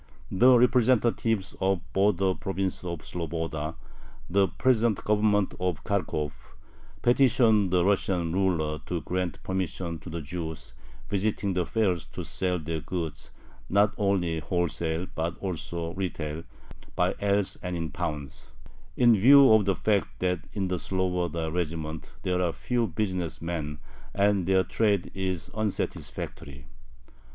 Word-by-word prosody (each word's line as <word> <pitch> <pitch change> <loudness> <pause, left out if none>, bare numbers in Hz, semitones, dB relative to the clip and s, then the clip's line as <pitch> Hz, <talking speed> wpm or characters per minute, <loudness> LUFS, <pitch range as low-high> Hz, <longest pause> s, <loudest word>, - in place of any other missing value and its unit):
The 125 +6 +6
representatives 115 -4 +2
of 95 0 +3
the 85 - -16
"Border 95 -1 +3
Province 95 0 -3
of 85 -3 -5
Sloboda," 80 -2 -4 0.5
the 95 +2 +3
present 120 -4 +1
Government 105 -2 +2
of 90 -3 -1
Kharkov, 80 -7 -1 0.7
petitioned 120 -5 +4
the 90 -1 +3
Russian 95 -4 +1
ruler 85 -5 +1
to 85 -2 -2
grant 90 0 -3
permission 90 -2 -3
to 85 - -10
the 85 +1 -4
Jews 80 0 -6 0.3
visiting 100 0 0
the 90 -2 0
fairs 95 -8 0
to - - -5
sell 90 -1 -1
their 80 0 -3
goods 80 -1 -5 0.4
not 105 +3 +4
only 95 -6 +1
wholesale 85 +1 -1
but 85 +1 -2
also 85 -2 -4
retail, 80 -4 -4 0.5
"by - - +2
ells 100 -1 +1
and 90 -1 -3
in 80 -2 -3
pounds," 70 -4 -5 0.4
in 120 -2 +6
view 135 +4 +8
of 110 -2 +5
the 95 -1 +2
fact 105 -2 0
that 90 -1 -1
"in 100 -2 -1
the 90 -1 -1
Sloboda 90 -4 -1
regiments 80 -2 -4
there 90 0 0
are 85 -2 +1
few 120 +5 0
business 90 -2 -2
men, 80 -3 -4 0.4
and 100 -2 +2
their 95 -1 +4
trade 100 -4 +1
is 95 -4 -3
unsatisfactory." 80 -9 -4
90 Hz, 135 wpm, -27 LUFS, 85-100 Hz, 0.7 s, view